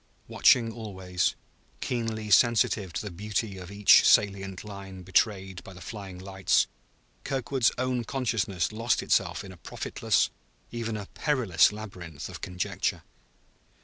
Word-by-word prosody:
Watching 115 -3 +4
always, 95 -5 -2 0.4
keenly 115 -3 -3
sensitive 110 -3 +4
to - - -3
the 105 - -5
beauty 105 +1 -3
of 90 0 -9
each 100 0 +6
salient 100 -2 +3
line 100 -3 -9
betrayed 95 0 0
by 95 - -11
the 90 - -12
flying 95 -1 -8
lights, 95 0 +1 0.6
Kirkwood's 135 -2 +1
own 125 -1 0
consciousness 110 -9 -1
lost 115 +3 0
itself - - +1
in 95 - -9
a 90 - -13
profitless, - - 0 0.4
even 115 -2 -3
a 105 - -6
perilous 120 - +3
labyrinth 90 -8 -8
of - - -9
conjecture. 90 -1 -2
100 Hz, 130 wpm, -28 LUFS, 95-115 Hz, 0.6 s, each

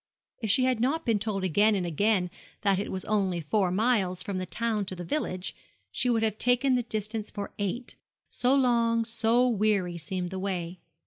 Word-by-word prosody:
If 220 - -2
she 240 +6 +4
had 255 -2 +2
not 285 +7 0
been 225 -4 +2
told 200 -2 -2
again 205 +4 +3
and 185 -3 -1
again 180 +2 +1 0.3
that 195 -2 +3
it 205 - -3
was 185 - -3
only 195 -4 0
four 185 +5 +1
miles 190 -3 +1
from 200 -3 -3
the 185 - -4
town 225 0 -1
to 185 - -6
the 175 - -6
village, 185 - -3 0.4
she 250 - 0
would 225 -2 +2
have 215 -1 -1
taken 250 +2 +3
the 250 - +2
distance 215 -1 -3
for 205 -1 -6
eight 220 +5 -3 0.3
so 250 +2 +2
long, 235 -3 +2
so 230 +2 +2
weary, 205 -6 +1
seemed 180 +3 -3
the 190 +1 -5
way. 180 -2 -3
210 Hz, 195 wpm, -28 LUFS, 185-235 Hz, 0.4 s, she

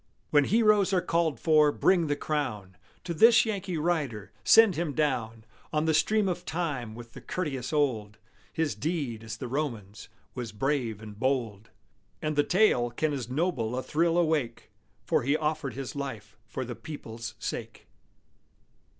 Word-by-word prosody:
When 145 -2 +5
heroes 210 -1 +3
are 180 - +3
called 165 -3 0
for, 155 -2 +4
bring 175 +1 +2
the 145 - +1
crown 120 -12 -3 0.3
To 175 - -3
this 225 +5 +6
Yankee 195 -5 -3
rider; 145 - -1
send 225 -5 +7
him 160 -2 -2
down 115 -7 -1 0.3
On 155 0 +1
the 160 - +2
stream 205 +7 +2
of 180 -1 -2
time 145 -11 -3
with 120 0 -11
the - - -10
Curtius 135 -9 -3
old; 115 -9 0 0.3
His 160 -2 -1
deed, 140 -9 -3
as 110 0 -6
the 125 - -5
Roman's, 115 -7 -4 0.2
was 120 -4 -6
brave 115 -2 -1
and 105 -1 -10
bold; 115 -5 -1 0.5
And 155 -1 -2
the 145 - +5
tale 175 - +3
can 150 +5 -1
as 130 -4 -4
noble 130 -5 -1
a 130 - -2
thrill 165 +2 +1
awake, 155 -9 0 0.3
For - - +2
he 140 +5 +1
offered 155 -5 -2
his 135 0 -6
life 110 -8 -6
for 130 +5 -4
the 120 - -5
people's 115 -8 -8
sake! - - -6
145 Hz, 160 wpm, -28 LUFS, 115-165 Hz, 0.5 s, send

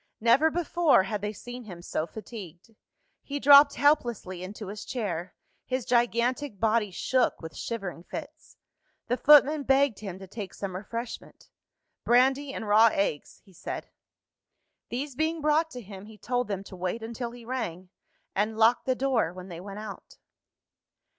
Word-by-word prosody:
Never 240 +8 +4
before 335 - +3
had 205 +1 -3
they 210 0 -2
seen 245 +4 -9
him 175 -4 -10
so 160 - -2
fatigued. 205 -1 -10 0.5
He 285 0 -5
dropped 285 +1 +8
helplessly 240 - +1
into 200 +2 -7
his 205 +1 -7
chair; 185 -8 -4 0.3
his 255 -1 -2
gigantic 240 0 +1
body 220 -1 +2
shook 250 +7 0
with 160 -1 -9
shivering 195 -7 -5
fits. - - -9 0.5
The 245 - +1
footman 295 +1 +6
begged 270 -4 +2
him 190 -3 -6
to 190 - -10
take 200 0 -8
some 195 -2 -5
refreshment. 230 +5 -7 0.5
"Brandy, 265 +3 +3
and 225 - -6
raw 220 +2 +6
eggs," 175 -8 -2
he 190 - -20
said. - - -6 1.0
These 270 +3 -4
being 315 +4 -1
brought 305 +2 +2
to 250 -5 -8
him, 195 0 -10
he 220 -1 -13
told 245 +3 -1
them 195 -2 -3
to 195 - -11
wait 185 +5 -3
until 235 +1 -4
he 240 0 -12
rang 185 -8 -4 0.4
and 215 +2 -1
locked 230 +3 +4
the 255 - +2
door 250 -10 +1
when 185 +1 -10
they 170 -1 -7
went 195 +2 -8
out. 210 -1 -9
230 Hz, 160 wpm, -28 LUFS, 195-260 Hz, 1.0 s, dropped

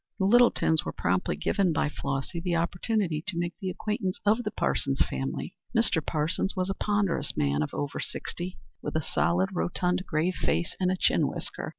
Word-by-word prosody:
The 190 - +1
Littletons 220 -7 +5
were - - -3
promptly 90 -3 0
given 180 - +1
by 155 0 +1
Flossy 140 +3 -3
the 175 0 0
opportunity 170 -1 0
to 185 -5 -2
make 175 0 -1
the 190 -3 -2
acquaintance 210 0 -2
of 215 +3 +4
the 210 - -2
Parsons 135 -8 0
family. 65 0 -3 0.2
Mr. - - +2
Parsons 160 +6 0
was 185 0 0
a - - -4
ponderous 200 -8 0
man 70 0 +2
of 75 - -1
over 145 0 -3
sixty, 180 +1 -4 0.2
with - - -4
a 160 - +1
solid, 175 +5 +1
rotund, 180 +1 0
grave 165 +3 +1
face 170 - 0
and 185 -1 +2
a 185 - 0
chin - - +3
whisker. - - -5
175 Hz, 185 wpm, -28 LUFS, 155-190 Hz, 0.2 s, Littletons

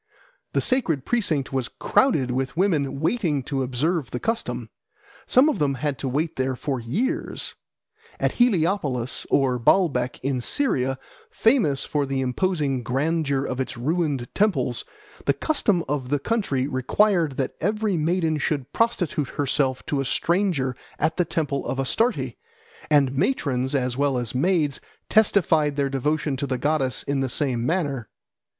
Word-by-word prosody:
The - - +2
sacred 170 - +1
precinct 160 - 0
was 130 -2 0
crowded 150 - +2
with 130 +3 -2
women 155 -8 +1
waiting 160 - 0
to 135 +1 -2
observe 135 +3 -1
the 125 - -4
custom. 225 - -3 0.6
Some 260 +4 +5
of 300 - 0
them 140 -2 +1
had 140 +1 -2
to 135 - -2
wait 155 +5 -1
there 130 0 0
for 135 0 -3
years. 235 - -2 0.7
At - - +1
Heliopolis 165 - +1
or 130 -3 +2
Baalbec 130 -2 +2
in 130 -2 0
Syria, 135 - +1 0.3
famous 220 - +2
for 145 -2 -1
the 135 0 -1
imposing 135 0 0
grandeur 140 +2 0
of 130 - -3
its 130 - -3
ruined 145 -1 -1
temples, 140 - +1 0.4
the - - +5
custom 210 - +1
of 135 -3 -2
the 145 - +2
country 145 - -1
required 155 - +1
that 135 - -1
every 210 +2 0
maiden 160 -1 +1
should 140 -2 -2
prostitute 180 - 0
herself 135 -2 0
to 140 -2 -1
a - - -3
stranger 165 -4 0 0.2
at 155 +1 0
the 180 - +2
temple 150 -4 -1
of 135 - -2
Astarte, 225 - 0 0.6
and 140 -3 +4
matrons 135 - 0
as 125 -2 0
well 140 -2 +1
as 120 -3 -3
maids 150 0 +1 0.3
testified 165 -9 +3
their 140 -1 0
devotion 145 +1 0
to 140 +1 -2
the 130 -1 -1
goddess 135 -1 0
in 140 -1 -1
the 135 -1 0
same 125 -3 0
manner. 145 - -1
145 Hz, 150 wpm, -24 LUFS, 130-175 Hz, 0.7 s, Some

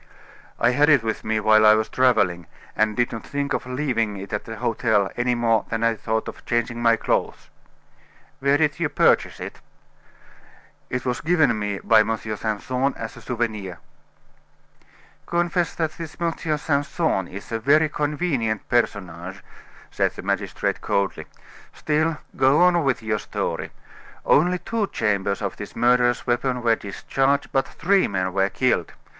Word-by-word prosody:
"I 120 - +4
had 145 +4 +3
it 140 -6 +5
with 110 - -3
me 110 0 0
while 110 0 +5
I 110 0 +7
was 110 0 0
traveling, 95 -11 +2 0.3
and 110 0 +1
did 120 -1 +1
not 115 - -6
think 140 0 -3
of - - -3
leaving 125 -6 -1
it 100 +2 -8
at 105 - -3
the 115 - -7
hotel 110 -4 +1
any 120 0 +1
more 115 -2 +2
than 115 0 -2
I 115 0 +3
thought 110 0 -2
of - - -9
changing 120 0 -1
my 115 -1 +5
clothes." - - -2 0.9
"Where 140 +1 +3
did 150 -2 +1
you - - 0
purchase - - +2
it?" - - -8 1.3
"It 125 0 -3
was 125 -1 -1
given 150 -9 +2
me 105 -1 -2
by 110 -1 +5
M. 110 +1 +1
Simpson 110 +5 -2
as 115 +2 -6
a 120 - -12
souvenir." 110 -6 -3 1.5
"Confess 175 0 0
that 160 -2 -1
this 165 -1 -9
M. 170 -1 0 0.2
Simpson 145 - 0
is 100 +5 -10
a 115 - -1
very 150 +7 +4
convenient 145 - -1
personage," 95 -5 -2 0.5
said - - 0
the - - -8
magistrate - - -2
coldly. 100 -1 -1 0.5
"Still, 155 +1 0 0.2
go 135 +6 +4
on 175 -2 +4
with 135 -4 0
your 110 -1 -1
story. - - -3 0.6
Only 180 +4 +4
two 210 +4 -2
chambers 100 - -1
of - - -3
this - - -8
murderous 120 0 +2
weapon 125 0 0
were 115 -1 +4
discharged, 135 +8 -1
but 135 - +1
three 195 +3 +2
men 95 -2 -2
were 95 0 +2
killed. 125 -9 0
120 Hz, 160 wpm, -23 LUFS, 110-145 Hz, 1.5 s, I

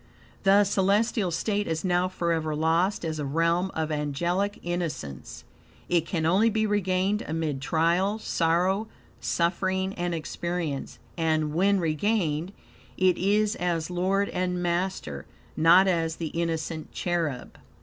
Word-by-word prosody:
The 200 +1 +5
celestial 200 +1 +1
state 205 +4 -1
is 160 +2 -2
now 180 0 +2
forever 165 -4 -1
lost 165 +5 +1
as 160 -1 -3
a - - -2
realm 165 +6 +1
of 160 0 -1
angelic 170 +8 -1
innocence. 165 - -4 0.5
It 175 -2 +2
can 160 -3 -1
only 195 +7 +4
be 220 0 +1
regained 200 0 +1
amid 155 -4 -2
trial, 170 +8 +1
sorrow, 185 +2 +1 0.3
suffering, 190 +2 0
and 175 -2 -2
experience, 165 -2 -4 0.2
and, 155 -2 +1
when 195 +4 +3
regained, 165 0 0 0.5
it 185 -2 +4
is 205 +3 +2
as 170 -2 -1
Lord 190 +3 +1
and 180 -1 -2
Master, 175 - -2 0.3
not 175 +4 +6
as 165 -3 +1
the 165 -2 -4
innocent 165 -1 -3
cherub. 165 -7 -3
175 Hz, 130 wpm, -26 LUFS, 160-190 Hz, 0.5 s, not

